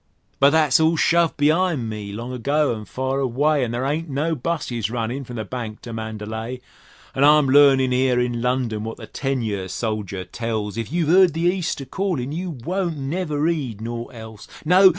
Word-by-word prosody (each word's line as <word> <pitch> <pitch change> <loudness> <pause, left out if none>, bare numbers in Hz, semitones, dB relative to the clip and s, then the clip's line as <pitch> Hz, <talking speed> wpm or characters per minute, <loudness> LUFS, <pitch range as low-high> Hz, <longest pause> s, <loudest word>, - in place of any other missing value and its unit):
But 140 - +7
that's 150 -3 +4
all 160 +1 +3
shove 170 +1 +3
be'ind 155 -3 +2
me 105 -2 -5
long 115 +5 -6
ago 140 +3 +1
an' 105 -1 -8
fur 130 +3 -2
away, 140 +3 +1
An' 120 - -1
there 120 +3 -2
ain't 155 +4 -2
no 150 +4 0
'busses 130 -7 -2
runnin' 120 +3 -3
from 120 -1 -9
the 110 -2 -4
Bank 110 -1 -6
to 120 - -7
Mandalay; 110 +2 -5 0.5
An' 135 - +1
I'm 150 -1 +6
learnin' 135 -2 +5
'ere 125 -1 +2
in 120 -1 -1
London 125 -4 -1
what 115 +1 -5
the 110 - -9
ten 135 +3 -2
year 100 -4 -3
soldier 100 -3 -3
tells: 110 0 -3
"If 115 +2 -4
you've 165 -2 +1
'eard 185 -2 +6
the 165 - -3
East 175 -3 0
a - - -6
callin', 145 -4 -2
you 180 +4 -3
won't 170 +4 -3
never 150 +1 -1
'eed 140 -11 -2
naught 115 +2 -6
else." 110 -2 -10 0.2
No! 185 +4 +7
130 Hz, 190 wpm, -22 LUFS, 115-155 Hz, 0.5 s, But